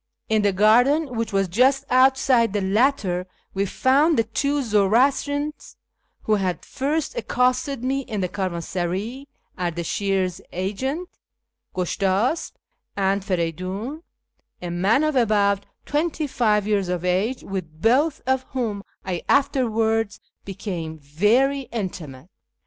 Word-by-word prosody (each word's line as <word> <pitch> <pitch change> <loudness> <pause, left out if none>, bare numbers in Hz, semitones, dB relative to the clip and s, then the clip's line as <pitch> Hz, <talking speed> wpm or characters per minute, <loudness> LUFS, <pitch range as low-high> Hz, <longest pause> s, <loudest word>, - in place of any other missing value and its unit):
In 220 -1 +3
the 205 -1 +3
garden, 245 +8 +3
which 230 0 -2
was 195 -1 +1
just 260 +9 +3
outside 255 -3 +4
the 205 - 0
latter, 195 -3 +1 0.3
we 200 +1 0
found 285 - +3
the 225 - +4
two 280 +6 -1
Zoroastrians 265 +8 +1 0.5
who 215 - +1
had 185 -5 -1
first 290 - -2
accosted 255 - 0
me 265 +2 0
in 225 -7 -4
the 180 - 0
caravansaray, 185 +7 -3 0.3
Ardashir's 180 +2 -1
agent, 260 - -3 0.7
Gushtasp, 195 - 0 0.4
and 195 0 +1
Feridun, 185 - -3 0.6
a 175 -1 -5
man 195 - +2
of 310 -2 0
about 200 -4 +2 0.2
twenty 305 +1 -1
five 215 -6 +1
years 205 -3 0
of 180 -1 -2
age, 195 +8 0
with 165 -5 -6
both 270 - +2
of 260 0 +1
whom 225 -6 -2 0.2
I 180 -2 -2
afterwards 225 -6 +1 0.3
became 175 -5 -5
very 225 - +1
intimate. 170 - -6
215 Hz, 120 wpm, -23 LUFS, 190-265 Hz, 0.7 s, outside